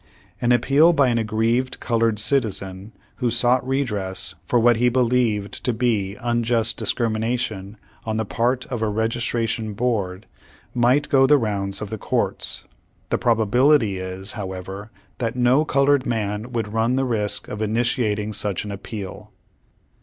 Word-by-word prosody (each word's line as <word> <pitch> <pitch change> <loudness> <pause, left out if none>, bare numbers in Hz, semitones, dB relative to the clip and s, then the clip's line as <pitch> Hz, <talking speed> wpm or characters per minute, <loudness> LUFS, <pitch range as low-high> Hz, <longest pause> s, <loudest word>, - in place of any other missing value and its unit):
"' - - -32
An 120 - +2
appeal 140 +7 +5
by 140 -5 +3
an 120 -1 +1
aggrieved 115 +3 0
colored 115 -2 +1
citizen, 105 -5 -1 0.3
who 125 -2 0
sought 120 +2 +2
redress 105 -9 -1
for 120 - +2
v/hat 120 0 +4
he 125 +1 +3
believed 120 -4 0
to 125 - +1
be 110 -4 0
unjust 120 -2 0
discrimination 110 -3 -2 0.3
on 110 -1 -2
the 110 - -1
part 125 +4 0
of 120 -3 -3
a 110 - +1
Registration 115 0 -1
Board, 100 -5 -1 0.5
might 125 +4 +3
go 135 -1 +4
the 150 - +6
rounds 100 -5 -2
of 105 - -8
the 110 - -4
Courts. - - 0 0.5
The - - +1
probability 115 -1 +3
is, 95 +2 -4
however, 95 0 -6 0.3
that 115 -1 -2
no 125 +5 +3
colored 140 -2 +2
man 110 0 -2
would 110 -3 -3
run 115 +3 +1
the 135 0 +1
risk 105 -4 -1
of 105 - -6
initiating 110 -1 0
such 105 -1 -2
an 105 - -5
appeal. 100 -1 -7
115 Hz, 150 wpm, -22 LUFS, 105-125 Hz, 0.5 s, the